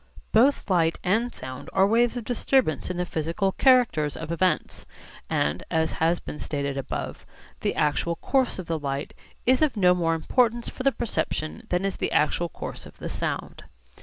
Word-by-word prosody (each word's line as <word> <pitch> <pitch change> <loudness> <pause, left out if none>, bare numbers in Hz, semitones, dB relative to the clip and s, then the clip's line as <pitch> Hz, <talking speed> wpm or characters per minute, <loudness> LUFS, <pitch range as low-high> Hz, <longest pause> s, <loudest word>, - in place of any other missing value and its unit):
Both 260 +6 +4
light 165 -4 +2
and 225 +7 +1
sound 130 0 -8
are 190 0 +5
waves 235 +4 +2
of 240 - -4
disturbance 245 - +1
in 180 - -3
the 180 - 0
physical 170 +4 -1
characters 235 - +3
of 160 0 -6
events; 180 +2 0 0.4
and 75 - 0
(as 160 0 +1
has 165 +2 +3
been 150 - -8
stated 140 -2 -2
above, 135 -2 -4 0.4
p. - - 0
188) - - +1
the - - -8
actual 150 +3 +1
course 260 +8 0
of 185 - -5
the 165 -1 -2
light 140 -1 -3 0.3
is 255 +3 +4
of 295 -7 +2
no 180 -2 +5
more 165 -2 +1
importance 235 +7 +1
for 265 +1 +1
perception 225 - -3
than 180 +2 0
is 195 - -2
the - - -1
actual 170 +3 +2
course - - -7
of - - -16
the - - -5
sound. - - -4
180 Hz, 185 wpm, -26 LUFS, 160-235 Hz, 0.4 s, are